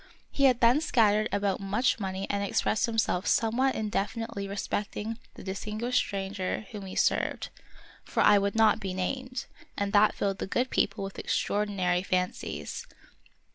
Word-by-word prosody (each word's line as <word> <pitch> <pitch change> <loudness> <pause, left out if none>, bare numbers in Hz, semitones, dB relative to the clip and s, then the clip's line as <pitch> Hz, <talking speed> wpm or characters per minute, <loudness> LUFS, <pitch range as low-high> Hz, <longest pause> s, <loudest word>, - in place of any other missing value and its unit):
He 275 - +2
had 255 -2 +4
there 245 +5 +5
scattered 215 -7 +3
about 200 -1 0
much 210 +6 +1
money 190 -1 -3
and 200 0 -1
expressed 215 +3 +1
himself 225 -5 0
somewhat 245 +4 +2
indefi 215 +1 -2
nitely 200 -3 -6
respecting 210 +2 -3 0.2
the - - -10
distinguished 215 +5 -1
stranger 195 +1 -3
whom 200 -3 -7
he 185 - -7
served, - - +1 0.5
for - - -1
I 205 - +7
would 200 +1 -1
not 220 -1 +4
be 190 -3 -4
named, 255 +6 -3 0.3
and 200 0 -1
that 210 +1 +5
filled 195 -1 -1
the - - -3
good 250 +6 0
people 200 0 0
with 195 0 -6
extraordinary 195 -4 0
fancies. 180 -1 -3
205 Hz, 155 wpm, -28 LUFS, 195-225 Hz, 0.5 s, I